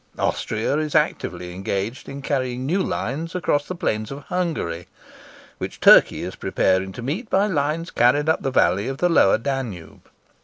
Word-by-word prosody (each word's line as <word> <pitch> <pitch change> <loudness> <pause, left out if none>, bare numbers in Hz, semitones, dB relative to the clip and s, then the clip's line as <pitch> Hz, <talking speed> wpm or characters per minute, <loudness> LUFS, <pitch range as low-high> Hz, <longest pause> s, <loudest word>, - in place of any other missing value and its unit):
Austria 110 +6 -1
is 155 -1 -3
actively 90 - -1
engaged 100 +5 -4
in 140 0 -8
carrying 130 -2 -2
new 180 +8 +1
lines 165 +1 -3
across 145 -5 0
the 185 - -4
plains 110 -9 -2
of 140 +1 -8
Hungary, 160 - -3 0.7
which - - -6
Turkey - - +6
is - - -5
preparing 95 0 0
to 120 - -8
meet 175 - -3
by 195 +2 +3
lines 165 -2 -1
carried 135 +5 +3
up 160 - +2
the 135 - -1
valley 95 -4 +2
of 135 0 -3
the 175 +4 +2
Lower 130 - +5
Danube. 115 - -5
135 Hz, 165 wpm, -22 LUFS, 105-160 Hz, 0.7 s, Turkey